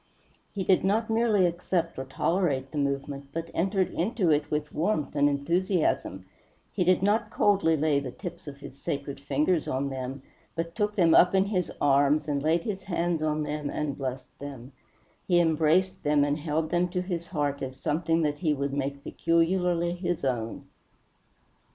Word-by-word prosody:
He 195 - -3
did 185 0 +3
not 220 +4 +1
merely 220 -4 +3
accept 170 -2 -1
or 135 - -4
tolerate 135 -1 0
the 150 - -3
movement, 140 0 -2
but 165 +2 -5
entered 190 +2 +1
into 185 -2 +1
it 145 0 +1
with 150 0 -2
warmth 160 -3 -1
and 145 0 +4
enthusiasm; 145 - 0 0.5
he - - +1
did 185 +1 +3
not 210 +3 +2
coldly 195 -6 +3
lay 150 -1 +2
the 140 -2 -5
tips 175 +4 -8
of 140 -1 -7
his 130 - -9
sacred 140 -4 -4
fingers 150 +4 0
on 135 +2 -1
them, 130 0 -5 0.3
but 165 0 -3
took 210 0 -1
them 170 -5 +4
up 180 +2 +6
in 190 0 +4
his 185 -4 -1
arms 145 +2 +3
and 145 -2 0
laid 160 +3 +2
his 195 -3 -3
hands 175 -3 -1
on 155 0 0
them 150 -1 -3
and 150 -2 -2
blessed 130 -1 -6
them; 135 -3 -8 0.6
he 175 -2 +4
embraced 165 +3 +2
them 145 -1 +3
and 145 +1 0
held 155 +1 -1
them 175 +1 +2
to 180 0 -2
his 175 -2 -4
heart 145 -4 -2
as 130 -1 -4
something 165 +2 0
that 145 -1 -1
he 155 -3 +1
would 140 0 -2
make 140 0 -3
peculiarly 170 +1 +1
his 175 -4 -2
own. 115 -4 -2
160 Hz, 175 wpm, -27 LUFS, 140-180 Hz, 0.6 s, up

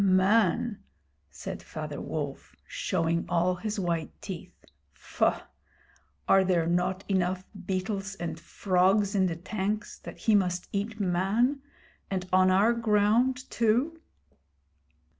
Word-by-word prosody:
'Man!' 195 +3 +3 0.5
said - - -7
Father - - -6
Wolf, - - -5
showing 165 +1 -1
all 175 +1 +2
his 210 +2 -3
white 170 -3 -1
teeth. 185 -3 -9 0.3
'Faugh! - - 0 0.8
Are 195 0 +6
there 180 -3 +2
not 180 +3 0
enough 185 -1 0 0.2
beetles 195 +1 -2
and 170 -3 -5
frogs 195 +3 +2
in 190 -2 +3
the 170 - -2
tanks 210 +4 -3
that - - -10
he 220 - +1
must 180 -3 +1
eat 210 +2 -3
Man, 205 +9 +1 0.5
and 185 -2 -2
on 185 0 +5
our 200 +5 +4
ground 230 +4 +2
too!' 245 +9 +1
195 Hz, 120 wpm, -28 LUFS, 180-215 Hz, 0.8 s, Are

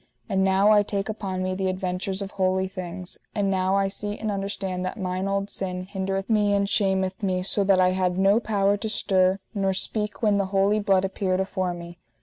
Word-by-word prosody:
And 190 0 +1
now 195 +2 +4
I 210 -1 +6
take 200 0 -3
upon 195 -4 -3
me 185 0 -1
the 190 0 -1
adventures 185 +1 -2
of 195 - -7
holy 190 0 +1
things, 185 -1 -7 0.2
and 200 -2 +1
now 190 0 +1
I 195 0 +2
see 205 +1 -4
and 215 -1 -2
understand 195 -2 -3
that 185 - -4
mine 185 0 -2
old 195 0 -1
sin 185 -1 -3
hindereth 195 0 -3
me 210 -2 +2
and 200 0 +1
shameth 190 -1 0
me, 185 -2 0
so 200 +2 +2
that 190 -1 +4
I 185 0 +5
had 185 -1 0
no 195 +3 +4
power 205 -3 +1
to 220 +2 -4
stir 190 -3 +2 0.2
nor 195 -2 0
speak 210 +2 -2
when 205 -2 +3
the 200 - +1
holy 195 +2 +2
blood 195 -2 +2
appeared 190 -1 -1
afore 185 -2 -1
me. 170 0 -10
195 Hz, 210 wpm, -25 LUFS, 185-200 Hz, 0.2 s, I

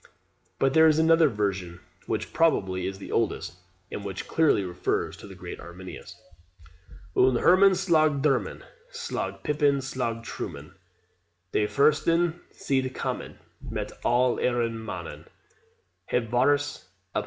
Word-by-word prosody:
But 135 0 +2
there 160 0 +7
is 155 -1 +4
another 160 -1 +5
version, 95 -6 -2 0.3
which - - -3
probably 95 - +1
is 95 0 -5
the 95 - -9
oldest, - - -1 0.4
and 100 - -5
which 95 -1 -5
clearly 160 -10 +3
refers 90 -1 -2
to - - -11
the 95 - -11
great 90 -1 -8
Arminius: 90 +2 -10 1.0
"Un 130 0 +4
Herman 190 +9 +6
slaug 155 -6 +2
dermen; 135 -4 0 0.3
Slaug 470 -1 -4
pipen, 145 -1 +2
slaug 125 -4 -3
trummen; 75 -4 -7 0.8
De 105 - +1
fursten 165 +5 +2
sind 130 -1 -1
kammen, - - -4 0.3
Met - - -4
all 125 +1 +3
eren 120 -2 0
mannen 90 -6 -7 0.8
Hebt 115 -2 -1
VARUS 145 -1 +1 0.3
uphangen." - - +3
130 Hz, 130 wpm, -26 LUFS, 100-155 Hz, 1.0 s, there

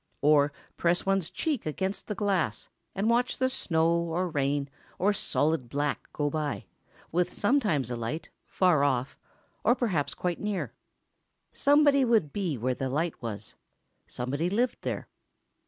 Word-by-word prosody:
Or 145 -1 +5 0.3
press 175 +1 +1
one's 195 -3 +1
cheek 300 - -2
against 190 +6 -3
the 210 - -3
glass 185 - 0 0.3
and 200 +3 0
watch 240 +2 +2
the 260 0 +2
snow 165 -10 +1
or 170 +2 -1
rain 140 -1 0 0.3
or 205 +3 +3
solid 155 -9 0
dark 145 +2 -2
go 145 - -1
by, 150 -1 -2 0.5
with 175 +2 +1
sometimes 205 - +1
a - - -1
light... 120 +8 -4 0.2
far 180 -6 +3
off, 130 -2 +1 0.5
or 240 +3 +5
perhaps 185 - 0
quite 175 -1 -2
near. 210 -2 -2 0.8
Somebody 285 -1 +5
would 220 - +2
be 180 -9 -1
where 125 +3 0
the 130 +1 -3
light 160 +5 -1
was—somebody 125 +6 -5
lived 235 +6 0
there. - - -3
165 Hz, 140 wpm, -28 LUFS, 145-205 Hz, 0.8 s, Or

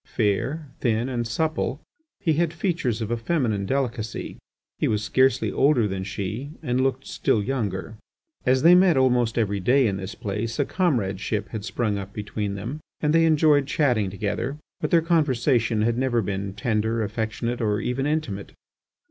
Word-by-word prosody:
Fair, 125 +9 0
thin, 115 0 +1
and 120 -3 -2
supple, 155 +1 -1 0.4
he 160 - +1
had 165 +1 +1
features 170 - -1
of 110 - -4
a 120 - +1
feminine 115 - 0
delicacy; 125 -5 -2 0.4
he - - +2
was 105 -1 0
scarcely 130 +4 +2
older 135 -6 +3
than 95 -1 -3
she, 105 +7 -4
and 125 +1 0
looked 130 0 0
still 105 - 0
younger. 110 -4 -3 0.5
As 130 +1 +2
they 170 +2 +8
met 180 -4 +5
almost 125 -3 +2
every 100 -3 +1
day 130 +8 +3
in 100 -3 0
this 95 +1 -6
place, 105 +3 -3
a 145 - +2
comradeship 105 - -1
had 110 -3 -5
sprung 105 +1 -1
up 100 0 -8
between 105 -1 -3
them, 120 +10 -5 0.2
and 150 0 +1
they 165 0 +5
enjoyed 150 -3 +4
chatting 125 -10 +1
together. 110 +7 -3 0.2
But 150 - -1
their 165 -2 +4
conversation 130 -8 +2
had 120 +2 +1
never 120 -3 +1
been 95 0 -3
tender, 110 +1 0
affectionate, 110 +3 -3
or 105 -2 +1
even 130 +4 -1
intimate. 150 -11 -2
120 Hz, 165 wpm, -24 LUFS, 105-140 Hz, 0.5 s, they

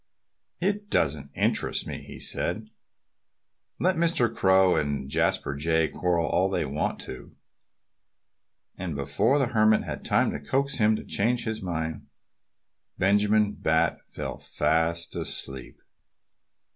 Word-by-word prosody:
"It 205 +3 -1
doesn't 70 - +1
interest - - +1
me," - - -6
he - - -11
said. - - -1 1.1
"Let 185 -1 +2
Mr. 165 -9 +2
Crow 95 -1 +4
and 70 -2 -1
Jasper 70 - 0
Jay 80 +2 +1
quarrel 85 -2 0
all 95 +2 +1
they 95 - -1
want 70 +2 -2
to!" 65 - -9 1.4
And 90 -5 -4
before 100 - +1
the 135 -4 +1
Hermit 110 -1 +4
had - - -6
time - - +2
to - - -4
coax 135 - -1
him 110 0 +4
to - - -6
change 120 +4 0
his 110 -1 -3
mind, 80 -4 -4 0.9
Benjamin 105 +2 +3
Bat 80 0 +1
fell 65 -1 -6
fast 80 +3 0
asleep. 65 -2 -4
95 Hz, 125 wpm, -26 LUFS, 75-110 Hz, 1.4 s, Crow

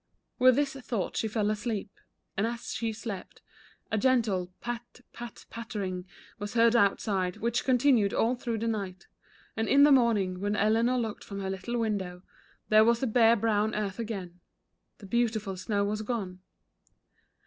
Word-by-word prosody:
With 255 0 +6
this 285 0 +1
thought 235 -7 -3
she 220 - 0
fell 215 -1 0
asleep. 215 -1 -3 0.4
And 200 +3 +1
as 235 0 -5
she 225 +1 -2
slept, 215 -4 -7 0.5
a 220 - +1
gentle 215 -8 +1
"pat 240 +1 -6
pat 240 -1 -9
pattering" 195 -5 -5 0.3
was 205 +2 -5
heard 230 0 +5
out 200 -4 +4
side, 185 -4 -1
which 235 +1 0
continued 250 -5 +3
all 230 +2 +2
through 240 -2 -3
the 230 +1 -2
night, 195 -4 -3 0.5
and 225 0 -1
in 280 +1 +6
the 295 - +7
morning 215 -8 +3
when 205 +2 -1
Eleanor 225 +4 +2
looked 225 -3 -3
from 200 -1 -7
her 190 -1 -3
little 195 +6 -3
window, 190 -6 -2 0.5
there 215 0 +7
was 235 +1 +3
the 265 - 0
bare 230 -1 +5
brown 215 -1 +1
earth 210 0 -3
again, 195 -6 -5 0.3
— - - -51
the 205 - -12
beautiful 220 -2 0
snow 200 +2 -1
was 210 +1 -2
gone. 205 -5 -4
220 Hz, 170 wpm, -29 LUFS, 200-235 Hz, 0.5 s, the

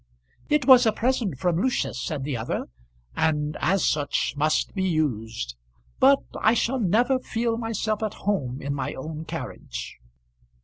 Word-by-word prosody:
"It 300 -3 +2
was 255 -3 +8
a - - +5
present 225 - 0
from 175 +4 +1
Lucius," 250 - 0
said 145 -4 -3
the 140 -1 -2
other, 115 0 -3 0.5
"and 150 -1 0
as 190 0 +2
such 145 -2 0
must 155 +2 +1
be 190 - -2
used. 110 - -2 0.4
But - - +5 0.2
I 220 +2 +4
shall 255 +3 +1
never 240 +6 +2
feel 230 -2 -1
myself 225 -2 -2
at 215 -1 -2
home 135 -12 -1
in 140 +1 -2
my 140 0 -3
own 155 +3 -6
carriage." 60 - -6
165 Hz, 150 wpm, -25 LUFS, 140-225 Hz, 0.5 s, was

